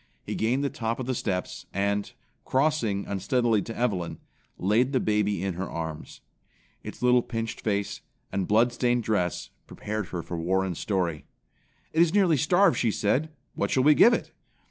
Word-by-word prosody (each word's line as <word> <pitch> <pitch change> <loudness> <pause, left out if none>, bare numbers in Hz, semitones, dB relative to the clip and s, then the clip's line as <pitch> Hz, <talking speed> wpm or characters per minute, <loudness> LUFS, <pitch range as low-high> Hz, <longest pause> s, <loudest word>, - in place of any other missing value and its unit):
He - - -5
gained 125 +5 0
the 140 - -1
top 115 -4 -3
of 130 - -3
the 130 - -1
steps 95 -6 -3
and, 100 +1 -1 0.3
crossing 130 -8 +1
unsteadily 115 +2 +1
to 115 +3 -7
Evelyn, 100 -8 -1 0.4
laid 115 +8 +2
the 130 - +3
baby 105 -4 0
in 95 -1 -1
her 90 +2 -4
arms. 80 -2 -6 0.6
Its - - -9
little 125 0 +5
pinched 115 -1 -4
face, 100 -2 -2 0.3
and 95 -1 -1
bloodstained 120 +2 +2
dress 90 -6 -1 0.2
prepared 105 -2 -4
her 85 -2 -5
for 85 - -5
Warren's 95 +1 0
story. 90 -6 -1 0.7
"It 160 - +4
is 170 +2 +3
nearly 185 -7 +4
starved," 175 +6 +3
she 120 - +2
said. 125 +9 0 0.2
"What - - -1
shall 130 - +2
we 150 +2 +7
give 235 - +7
it?" - - -6
110 Hz, 165 wpm, -27 LUFS, 95-130 Hz, 0.7 s, we